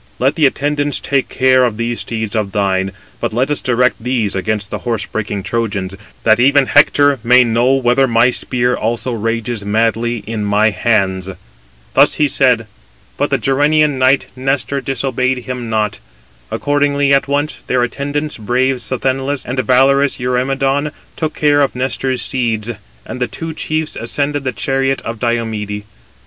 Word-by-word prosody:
Let 135 +3 +2
the 155 -3 +4
attendants 145 +1 -1
take 135 -1 -1
care 130 0 +3
of 120 -4 0
those 115 +1 -2
steeds 110 -2 -4
[of 105 -3 -1
thine], 95 -2 0 0.3
but - - -2
let 130 +5 0
us 145 - -1
direct 125 -1 +1
these 120 -5 0
against 105 +1 -2
the - - -3
horse 115 -4 -2
breaking 105 -2 -4
Trojans, 105 -5 -2 0.3
that 110 0 +4
even 140 +2 +4
Hector 145 -1 +4
may 125 +1 +6
know 120 +2 +2
whether 130 +1 +2
my 120 +1 +3
spear 125 0 0
also 120 +3 -2
rages 115 0 -2
madly 115 +2 0
in 110 -1 -3
my 105 +2 +2
hands." 95 -2 0 0.6
Thus - - +5
he 150 - +2
said: 125 -5 +2 0.5
but - - -1
the - - +2
Gerenian 145 +1 +2
knight 130 +1 +3
Nestor 135 0 -1
disobeyed 130 -1 -1
him 125 -2 -5
not. 110 -1 -1 0.5
Accordingly, 145 -1 +1
at 140 - +2
once 145 +2 -1
their 125 -1 +2
attendants, 145 +4 -3
brave 125 +4 0
Sthenelus 130 +4 -2
and 130 +1 -3
valorous 135 +2 +3
Eurymedon, 135 +3 0 0.2
took 155 -1 -3
care 145 -1 +3
of 140 - +1
Nestor's 130 -1 -1
steeds: 115 -3 -1 0.3
and 130 - -7
the 125 - +1
two 165 -1 -6
chiefs 155 0 -3
ascended 145 +4 -2
the 130 - 0
chariot 135 +4 -1
of 115 -1 -5
Diomede. 110 -3 -2
125 Hz, 160 wpm, -16 LUFS, 115-135 Hz, 0.6 s, may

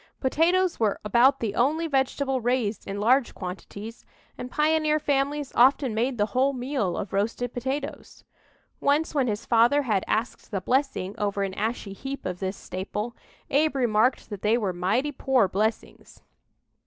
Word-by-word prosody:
Potatoes 345 +6 +2
were 215 -3 +1
about 245 +6 +4
the 220 -3 -1
only 295 +9 +1
vegetable 270 -2 0
raised 235 -3 -1
in 200 0 -4
large 245 +4 +2
quantities, 200 +4 -8 0.3
and 250 - -7
pioneer 305 +1 +2
families 285 -1 -1
often 260 0 +4
made 240 +3 0
the 205 - +2
whole 265 +2 +2
meal 250 -8 -2
of 195 - -5
roasted 225 +4 -1
potatoes. 265 +3 -5 0.6
Once 295 +3 +1
when 275 -4 +1
his 215 0 -3
father 240 +5 +4
had 210 -7 0
"asked 225 +2 -2
the 200 - -2
blessing" 250 -3 0
over 200 -1 0
an 195 -1 -3
ashy 215 -1 -3
heap 270 +7 -7
of 180 -1 -3
this 190 0 -3
staple, 210 +5 -5 0.4
Abe 300 +2 +2
remarked 240 -2 +1
that 200 -2 -6
they 215 +3 +3
were 200 -6 -1
"mighty 205 +12 0
poor 265 -6 +2
blessings!" 215 +4 -3
245 Hz, 155 wpm, -26 LUFS, 205-275 Hz, 0.6 s, about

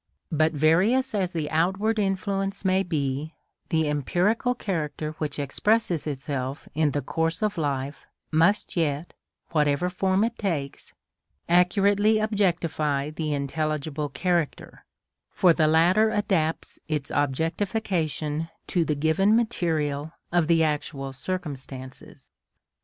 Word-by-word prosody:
But 155 0 +2
various 190 - +3
as 190 -4 0
the 160 -4 -2
outward 195 +7 +1
influence 195 0 -1
may 190 0 +3
be, 150 -3 -2 0.3
the 160 -3 +1
empirical 180 - +1
character 155 -7 -3
which 150 -2 -3
expresses 170 +4 0
itself 135 -1 -4
in 155 0 +2
the 145 -1 -2
course 165 - -1
of 210 -1 0
life 140 -3 -3 0.2
must 170 +7 +2
yet, 155 -1 -1 0.4
whatever 150 +2 +1
form 190 +2 +1
it 230 +1 -2
takes, 155 -9 -3 0.5
accurately 200 +4 +4
objectify 170 -9 0
the 155 0 -3
intelligible 150 +1 -2
character, 170 +2 -2 0.4
for 180 -3 +4
the 155 -1 +3
latter 175 +8 +4
adapts 190 -7 -1
its 150 -3 -2
objectification 160 - -1 0.2
to 175 - +1
the 155 -2 -1
given 160 +8 +3
material 160 -9 0 0.2
of 175 -2 +2
actual 150 -4 0
circumstances. 135 -5 -6
160 Hz, 115 wpm, -26 LUFS, 150-195 Hz, 0.5 s, accurately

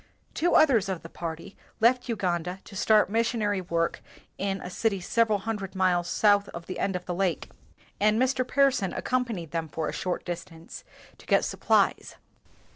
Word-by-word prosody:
Two 350 +2 +1
others 235 -11 +4
of 185 -3 -4
the 165 - -9
party 165 +2 -7 0.2
left 245 +2 +3
Uganda 180 -5 -1
to 200 - -13
start 215 +2 +4
missionary 220 -3 0
work 170 -2 -1 0.4
hi 195 0 -1
a - - -5
city 200 +2 -1
several 220 +3 +2
hundred 200 -2 -5
miles 180 -2 +2
south 205 -1 +3
of 170 0 -7
the 185 - -6
end 195 -1 -1
of 180 0 -4
the 180 - -3
lake, 180 -3 -1 0.5
and 215 +2 +3
Mr. 260 0 +2
Pearson 255 -7 +2
accompanied 235 -11 -2
them 165 -1 -2
for 155 +1 -3
a - - -5
short 180 -1 -3
distance, 170 -1 -8 0.4
to - - -17
get - - +3
supplies. - - +1
195 Hz, 170 wpm, -27 LUFS, 175-225 Hz, 0.5 s, others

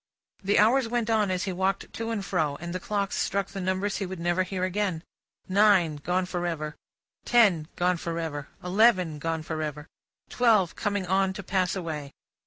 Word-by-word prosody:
The 200 +2 +2
hours 230 +4 +4
went 235 -1 -1
on 215 -3 +2
as 185 0 -1
he 190 - -2
walked 190 +2 -1
to 225 0 -4
and 215 -4 -2
fro, 155 -7 0
and 170 +3 -6
the 185 - -2
clocks 200 +1 -2
struck 200 0 -1
the 195 - -6
numbers 190 +2 -1
he 200 - -2
would 185 -1 -6
never 175 +2 +1
hear 185 0 -2
again. 185 -3 -1 0.4
Nine 190 -5 +4
gone 180 +5 -1
for 175 -1 -3
ever, 155 -3 -4 0.5
ten 200 -10 +4
gone 180 0 +1
for 170 0 -4
ever, 145 -4 -4 0.2
eleven 180 -5 +3
gone 165 0 -2
for 160 -1 -4
ever, 150 -1 -4 0.4
twelve 220 -8 +3
coming 205 -2 -1
on 190 +1 +1
to 200 - -7
pass 185 0 0
away. 155 -6 -5
185 Hz, 190 wpm, -27 LUFS, 165-200 Hz, 0.5 s, hours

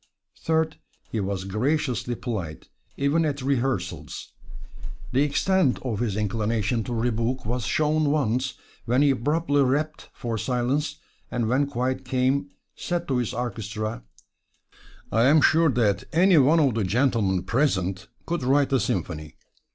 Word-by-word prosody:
Third, 160 -1 0 0.3
he 110 - -1
was 95 -1 -2
graciously 120 +3 -1
polite, 100 -11 -5 0.3
even 140 +4 +2
at 145 -3 -2
rehearsals. 135 -1 -2 0.8
The 130 - +2
extent 150 +1 +2
of 115 -6 -2
his 110 -4 -1
inclination 110 +2 0
to 120 - -4
rebuke 115 +2 -1
was 120 +1 -2
shown 155 -1 +2
once 130 -3 0 0.3
when 125 +4 +3
he 145 - +5
abruptly 145 +3 +1
rapped 145 +4 0
for 115 -3 -4
silence, 135 +6 -1 0.3
and 115 -2 -1
when 135 +4 +2
quiet 130 -1 -2
came 130 -3 0 0.3
said 175 -1 -3
to 130 - +1
his 120 -3 -1
orchestra: 110 -2 -4 1.1
"I 115 +2 +3
am 150 +4 +6
sure 160 +2 +4
that 105 -6 +1
any 175 0 +5
one 150 +5 +5
of 140 -6 +3
the 110 -1 0
gentlemen 100 -3 +1
present 100 -5 0 0.2
could 170 -2 -2
write 135 +2 +2
a 135 - +4
symphony. 80 -7 -3
125 Hz, 140 wpm, -25 LUFS, 110-145 Hz, 1.1 s, am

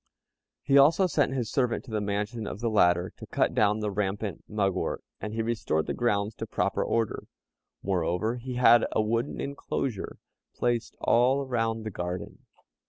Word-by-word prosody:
He 140 0 +5
also 165 +7 +5
sent 145 -6 +1
his 120 -4 -2
servant 125 -3 0
to 120 - -11
the 110 -1 -1
mansion 105 +2 -2
of 100 - -6
the 115 0 -1
latter 90 -3 +3
to - - -10
cut - - +1
down 105 +1 +2
the 105 -1 -1
rampant 100 -2 -2
mugwort, 100 -3 -1 0.2
and 110 - -5
he 115 - 0
restored 110 -9 -1
the - - -2
grounds 105 -3 0
to - - -5
proper - - 0
order. 115 -2 -1 0.6
Moreover, 95 +5 0
he 125 +1 -6
had 120 -1 +6
a - - +2
wooden 115 +4 -1
enclosure 135 -5 -3 0.4
placed 120 -1 -1
all 130 +4 +3
round 115 -3 -1
the 110 - -3
garden. 90 0 -6
110 Hz, 170 wpm, -28 LUFS, 100-120 Hz, 0.6 s, had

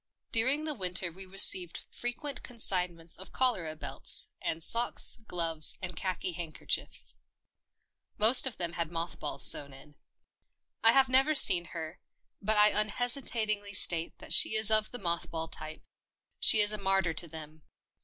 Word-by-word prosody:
During 260 +6 +1
the 310 -1 -5
winter 180 -5 -2
we 190 +3 -14
received 185 -2 +1
fre 245 - -9
quent 280 +1 -8
consignments 180 -8 -3
of 190 - -12
cholera 190 -12 -2
belts - - +4
and 160 0 -3
socks, 235 +3 +3
gloves 165 -3 0
and 180 -2 -8
khaki 185 0 -5
handkerchiefs. 165 -2 -4 1.0
Most 235 +5 +5
of 255 - -8
them 170 -2 -6
had 170 -1 -5
moth 165 0 -7
balls 150 - +3
sewn 140 -1 +3
in. 140 +2 -18 0.9
I 225 +1 +4
have 270 -1 +3
never 270 +4 +2
seen 175 -10 +5
her, 165 -1 -10 0.4
but 215 +1 -1
I 210 0 +4
unhesitatingly 215 -2 -2
state 170 -3 +1
that - - -3
she - - +6
is 220 0 +2
of 215 0 +1
the 245 - -8
moth 170 -5 -5
ball 165 0 -7
type 155 -1 -10 0.3
— - - -65
she 215 - +5
is 205 0 +1
a 215 - -4
martyr 195 -3 -2
to 170 +2 -2
them. 155 0 -13
190 Hz, 165 wpm, -28 LUFS, 165-225 Hz, 1.0 s, she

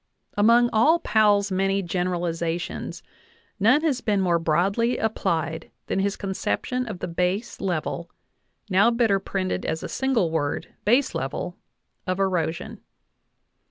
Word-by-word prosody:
Among 235 +3 +5
all 265 +10 +5
Powell's 210 - +3
many 195 +1 +1
generalizations 175 -1 -2 0.6
none 240 +9 +5
has 275 -6 +1
been 210 -3 +1
more 175 -3 +2
broadly 195 +9 +1
applied 170 -7 -1 0.2
than - - -1
his 200 +1 0
conception 250 +6 -2
of 210 - -5
the - - -4
base 180 +6 -2
level 170 -2 -2 0.6
(now 200 +3 +4
better 230 -4 +2
printed 190 -1 -2
as 160 - -3
a - - -3
single 245 -11 0
word, 145 -3 -2
baselevel) 210 - +1 0.5
of 185 +1 -1
erosion. 180 -4 -1
195 Hz, 125 wpm, -24 LUFS, 175-225 Hz, 0.6 s, Among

